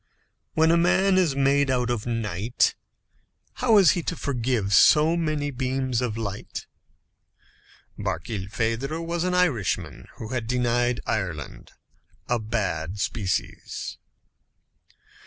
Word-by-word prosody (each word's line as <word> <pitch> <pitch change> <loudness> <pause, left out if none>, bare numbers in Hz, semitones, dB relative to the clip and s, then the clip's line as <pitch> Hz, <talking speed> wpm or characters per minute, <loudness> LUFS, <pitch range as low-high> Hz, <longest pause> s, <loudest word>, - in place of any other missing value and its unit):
When 160 +1 +4
a 170 - +4
man 185 +2 +3
is 165 -7 +2
made 140 0 +3
out 125 -2 +1
of 120 -1 -3
night, 115 -1 0 0.9
how 230 -4 +5
is 190 -5 +7
he 175 - -1
to 170 - -3
forgive 120 -8 -1
so 155 - +6
many 155 -3 -1
beams 130 -1 -1
of 115 -3 -2
light? 100 -3 -5 1.3
Barkilphedro 115 +8 -2
was 170 0 -2
an 180 0 0
Irishman 145 - 0
who 110 - -8
had 120 -3 -3
denied 120 0 +1
Ireland 90 -9 -4 0.5
a 120 -1 +1
bad 100 -5 -2
species. 100 -2 -3
125 Hz, 115 wpm, -25 LUFS, 110-155 Hz, 1.3 s, is